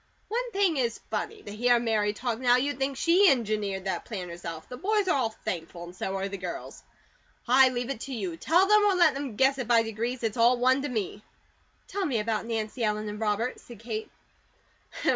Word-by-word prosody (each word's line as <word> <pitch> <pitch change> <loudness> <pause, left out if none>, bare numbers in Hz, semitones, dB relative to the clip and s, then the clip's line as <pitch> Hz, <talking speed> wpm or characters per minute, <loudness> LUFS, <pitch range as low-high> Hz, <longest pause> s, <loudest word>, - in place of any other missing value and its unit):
One 480 +3 -2
thing 385 -6 +2
is 235 -3 -1
funny. 430 -1 -3
To - - -8
hear 245 +2 +4
Mary 220 -3 +1
talk 235 +1 -3
now, 245 -1 +4
you'd 275 +3 -1
think 270 0 -1
she 360 +7 +5
engineered 210 -7 0
that 190 - -2
plan 185 -6 -6
herself. 165 -2 -7
The 250 - -7
boys 410 - 0
are - - +3
all 250 -5 +1
thankful, 175 -5 -6
and 175 +1 -10
so 190 +1 -3
are 195 0 -2
the 200 -1 -6
girls. 180 -2 -6 0.7
I 260 +2 +6
leave 245 +1 -3
it 260 - -5
to - - -4
you. 190 -7 -3
Tell 345 - +3
them 425 +1 +5
or 400 -2 +3
let 345 -5 +5
them 275 -5 -5
guess 270 +3 +3
it 250 - -3
by 230 -1 +5
degrees, 230 +3 -3
it's 225 0 -1
all 240 +2 +5
one 255 +2 +3
to 290 - -3
me." 210 -3 -3 0.7
"Tell 395 +1 -3
me 255 -6 0
about 220 +1 -1
Nancy 225 +1 -3
Ellen 215 0 0
and 210 0 -6
Robert," 220 +3 -1
said 240 - -13
Kate. 220 0 -5
235 Hz, 215 wpm, -27 LUFS, 210-270 Hz, 0.7 s, I